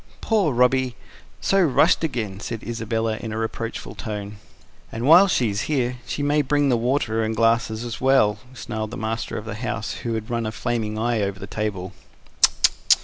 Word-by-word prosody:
"Poor 210 -9 +2
Robby... 125 0 +2 0.5
so 195 0 +3
rushed 160 -1 +4
again!" 115 -10 -2
said 115 0 -5
Isabella 115 -1 -2
in 115 -2 -6
a 110 - -4
reproachful 115 +1 -4
tone. 105 -1 -6 0.5
"And 115 +2 -4
while 170 +7 +8
she's 110 - 0
here 125 -4 0
she 145 - -3
may 145 +1 +3
bring 145 0 +1
the 125 - +4
water 115 -2 0
and 110 0 -1
the - - -12
glasses 115 0 +2
as 120 - -6
well," 130 -6 +3 0.2
snarled 110 -2 -4
the - - -7
master 110 +1 -3
of 110 - -6
the 115 - -5
house, 110 0 -4
who 115 -1 -2
had 110 +1 -5
run 115 -2 -1
a - - -3
flaming 110 -2 -2
eye 115 0 0
over 100 -1 -2
the 100 - -6
table. 100 -3 -4
115 Hz, 185 wpm, -23 LUFS, 110-125 Hz, 0.5 s, while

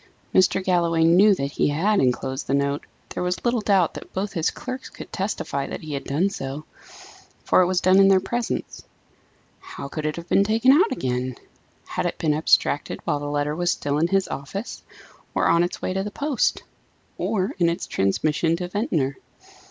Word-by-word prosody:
Mr. 185 0 +3
Galloway 170 -3 +2
knew 190 +5 +6
that 140 -4 -3
he - - +1
had 190 +9 +2
enclosed 130 +2 -1
the 135 - +1
note; 140 +1 -1 0.2
there - - -5
was 180 +4 -2
little 240 -1 +2
doubt 195 -5 +2
that - - -10
both 195 +2 -3
his 165 -1 +1
clerks 255 +1 -7
could - - -11
testify 185 -8 -2
that - - -6
he 155 -2 -6
had 140 -1 -4
done 155 +8 +1
so, 145 -5 -5 0.8
for - - +4
it 180 - +3
was 185 -1 +1
done 185 +1 +5
in 195 - +7
their 195 -1 +5
presence. 235 +5 -4 0.8
How - - -8
could 155 +1 -3
it 155 - -2
have 170 0 -8
been 195 - +4
taken 225 +5 +4
out 360 +11 +4
again? 125 -3 -2 0.5
Had - - -2
it - - -4
been 155 -2 +1
abstracted 150 -1 +1
while 150 -3 -1
the 145 - -5
letter 145 +1 -1
was 175 +1 0
still 145 -2 0
in 165 - +3
his 195 +1 +1
office? 195 - -6 0.5
or - - +2
on 170 0 +4
its 175 - -2
way - - -1
to 190 - -1
the 210 - -4
post? 280 +4 0 0.6
or 190 -3 0
in 170 -1 +4
its 170 - -3
transmission 155 - +1
to 175 +1 -5
Ventnor? 160 - -1
170 Hz, 195 wpm, -23 LUFS, 145-195 Hz, 0.8 s, in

